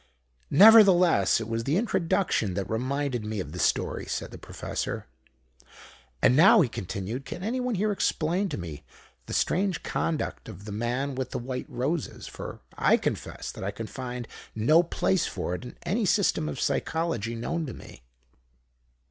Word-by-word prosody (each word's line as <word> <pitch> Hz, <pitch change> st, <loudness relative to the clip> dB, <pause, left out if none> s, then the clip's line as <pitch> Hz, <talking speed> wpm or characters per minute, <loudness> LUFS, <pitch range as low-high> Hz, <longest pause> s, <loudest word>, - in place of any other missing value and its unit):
"Nevertheless, 185 Hz, -, +7 dB
it 110 Hz, -, -5 dB
was 115 Hz, 0 st, -2 dB
the 145 Hz, +7 st, +1 dB
introduction 170 Hz, -, 0 dB
that 95 Hz, -2 st, -2 dB
reminded 130 Hz, +2 st, -1 dB
me 105 Hz, 0 st, -3 dB
of 75 Hz, -6 st, -5 dB
the 90 Hz, -, -7 dB
story," -, -, 0 dB
said -, -, -4 dB
the -, -, -10 dB
Professor. -, -, -4 dB, 1.2 s
"And 125 Hz, -, +6 dB
now," 190 Hz, -, +7 dB
he 135 Hz, -, +2 dB
continued, 100 Hz, +6 st, -5 dB
"can 180 Hz, -, -7 dB
anyone 250 Hz, +2 st, -1 dB
here 210 Hz, +3 st, +1 dB
explain 185 Hz, 0 st, 0 dB
to 150 Hz, -, -4 dB
me 80 Hz, -4 st, -7 dB, 0.4 s
the -, -, -5 dB
strange 190 Hz, -2 st, 0 dB
conduct 155 Hz, -7 st, -2 dB
of 100 Hz, -1 st, -10 dB
the 105 Hz, -, -6 dB
man 120 Hz, +6 st, -2 dB
with 130 Hz, -1 st, -3 dB
the -, -, -4 dB
white 125 Hz, +1 st, -5 dB
roses? 145 Hz, +6 st, -3 dB
For -, -, -8 dB
I -, -, +4 dB
confess -, -, -4 dB
that -, -, -8 dB
I 95 Hz, -, -1 dB
can 110 Hz, +2 st, -6 dB
find 125 Hz, 0 st, -6 dB, 0.3 s
no 150 Hz, +10 st, +5 dB
place 180 Hz, +1 st, 0 dB
for 90 Hz, -, -3 dB
it 90 Hz, -, -5 dB
in 125 Hz, -, -10 dB
any 200 Hz, +6 st, 0 dB
system 180 Hz, -5 st, +2 dB
of -, -, -5 dB
Psychology 160 Hz, -9 st, -1 dB
known 160 Hz, +7 st, -3 dB
to 125 Hz, -, -6 dB
me." -, -, -13 dB
135 Hz, 165 wpm, -27 LUFS, 110-175 Hz, 1.2 s, Nevertheless